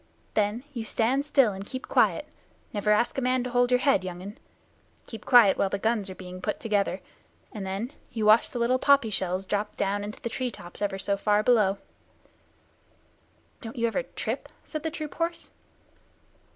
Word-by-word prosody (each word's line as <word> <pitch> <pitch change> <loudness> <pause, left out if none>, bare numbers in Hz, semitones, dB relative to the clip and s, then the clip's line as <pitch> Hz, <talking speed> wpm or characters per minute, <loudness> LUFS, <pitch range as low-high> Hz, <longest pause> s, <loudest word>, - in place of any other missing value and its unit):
Then 215 +3 0
you 235 -3 -4
stand 245 +6 +1
still 270 -8 +4
and 190 +1 -6
keep 260 +5 -7
quiet - - +2 0.5
never 210 0 -1
ask 225 +5 +2
a - - -3
man 255 0 +1
to 250 - -4
hold 245 0 +3
your 250 0 +4
head, 270 -10 +3
young 180 -1 -6
un 205 +2 -9 0.7
keep 225 - -10
quiet 235 -7 +6
while 195 - +2
the 200 - -1
guns 215 -1 0
are 185 - -7
being 185 0 -9
put 210 - -2
together, 205 -3 0 0.5
and 200 -3 -6
then 205 +8 -4 0.2
you 220 -2 -2
watch 215 +2 +6
the - - -6
little 240 +2 +2
poppy 280 -6 +4
shells 185 -1 -1
drop 205 +2 -2
down 200 0 0
into 210 +1 -7
the - - -4
tree 250 +2 -2
tops 175 -5 -8
ever 200 -1 -1
so 200 +1 0
far 210 +1 +2
below." 210 -5 +3 1.8
"Don't 225 -3 -8
you 235 - +1
ever 230 - 0
trip?" - - -4
said 310 - -5
the 320 - -2
troop 305 -2 -6
horse. 335 0 -2
220 Hz, 190 wpm, -27 LUFS, 200-250 Hz, 1.8 s, quiet